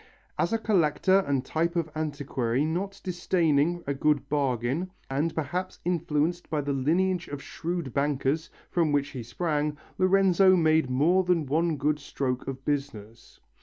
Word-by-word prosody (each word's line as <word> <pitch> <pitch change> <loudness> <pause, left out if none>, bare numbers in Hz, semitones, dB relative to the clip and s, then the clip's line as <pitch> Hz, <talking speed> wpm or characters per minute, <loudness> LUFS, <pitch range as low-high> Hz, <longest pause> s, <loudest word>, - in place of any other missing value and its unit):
As - - +1
a 225 - +2
collector 190 -3 +3
and 135 -2 0
type 170 +4 -1
of 170 -2 0
antiquary 140 -4 -1
not 195 +5 -3
disdaining 175 -2 +1
a 140 - -1
good 150 +1 +1
bargain, 140 +4 0 0.2
and 155 +4 0
perhaps 175 +5 -3
influenced 170 0 0
by 150 -2 0
the 140 0 -2
lineage 170 +6 +1
of 145 - -6
shrewd 165 -2 -4
bankers, 145 +2 0 0.2
from 165 -4 +2
which 145 -1 +1
he 130 - -6
sprang, 150 +4 -2 0.2
Lorenzo 190 0 +5
made 160 -5 +3
more 165 +9 +3
than 175 -4 +1
one 160 +3 +1
good 150 +2 0
stroke 130 -3 -3
of 135 0 -6
business. 115 -6 -4
155 Hz, 150 wpm, -27 LUFS, 140-175 Hz, 0.2 s, Lorenzo